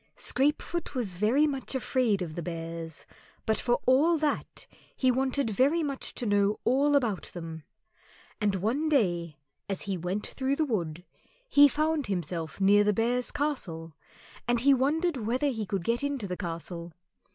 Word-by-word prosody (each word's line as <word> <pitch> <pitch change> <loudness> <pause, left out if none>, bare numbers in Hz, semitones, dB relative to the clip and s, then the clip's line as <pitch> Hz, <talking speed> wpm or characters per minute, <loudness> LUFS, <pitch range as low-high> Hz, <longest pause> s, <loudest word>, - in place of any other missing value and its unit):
Scrapefoot 300 +3 -1
was 225 -8 -1
very 220 +11 +3
much 275 -2 -3
afraid 240 -6 +1
of 160 -3 -6
the 170 - -4
Bears, 165 -1 -5 0.4
but 220 - +1
for 240 -1 +1
all 300 +7 +4
that 300 -1 -2 0.3
he 260 -1 +3
wanted 260 -1 0
very 280 +10 +3
much 275 -3 -4
to 245 - -3
know 205 0 +2
all 280 +4 +3
about 230 -9 0
them. 165 -2 -7 0.8
And 205 -2 +2
one 240 - 0
day 175 - +1 0.3
as 195 - -2
he 195 -2 -2
went 180 +4 -2
through 270 +1 -1
the 315 - +1
wood 175 - -3 0.4
he 290 -10 +7
found 305 -1 0
himself 170 -3 -3
near 200 +1 +5
the 210 0 +2
Bears' 240 +4 0
Castle, 170 - -3 0.5
and 240 -1 +2
he 280 +2 +6
wondered 300 +5 +1
whether 250 +5 0
he 220 -6 -3
could 195 -4 -2
get 235 +7 0
into 280 -7 -2
the 180 - -3
castle. 170 -1 -6
230 Hz, 165 wpm, -28 LUFS, 180-275 Hz, 0.8 s, he